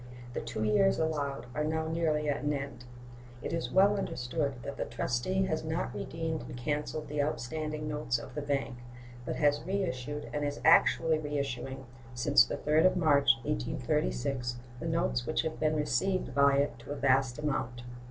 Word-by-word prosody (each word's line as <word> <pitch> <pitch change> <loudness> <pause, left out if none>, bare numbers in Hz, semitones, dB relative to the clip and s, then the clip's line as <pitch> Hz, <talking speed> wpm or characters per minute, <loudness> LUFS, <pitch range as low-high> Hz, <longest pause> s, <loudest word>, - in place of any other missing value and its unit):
The - - -2
two 110 - -4
years 195 - +3
allowed 145 -3 -1
are 150 - -1
now 160 +1 -1
nearly 160 -2 0
at 145 - 0
an 145 0 +1
end. 140 -3 -5 0.6
It - - -3
is 165 - -2
well 200 +2 +5
understood 140 -4 -2
that 140 - -6
the - - -2
trustee 125 +11 -1
has 155 -4 -1
not 160 +1 -2
redeemed 160 -1 -3
and - - -8
canceled 150 +3 -2
the 150 0 -1
outstanding 150 +2 -3
notes 150 -5 -1
of 115 - -9
the 150 - -3
bank, 140 -3 -2 0.5
but - - -1
has 145 -1 +2
reissued 150 -7 -2
and 150 - -1
is 145 0 -2
actually 160 -1 +5
reissuing, 135 -3 -3 0.3
since 120 - +5
the 60 - -4
3d 155 +4 +4
of 185 - +1
March, 145 -5 +5
1836, 60 - -1 0.2
the 165 - -4
notes 165 -7 0
which 155 - +1
have 160 -1 -4
been 155 0 +2
received 185 +5 0
by 140 0 +5
it 140 -4 0
to 120 - -13
a - - -2
vast 135 -2 +2
amount. 130 -5 -2
145 Hz, 175 wpm, -31 LUFS, 130-160 Hz, 0.6 s, well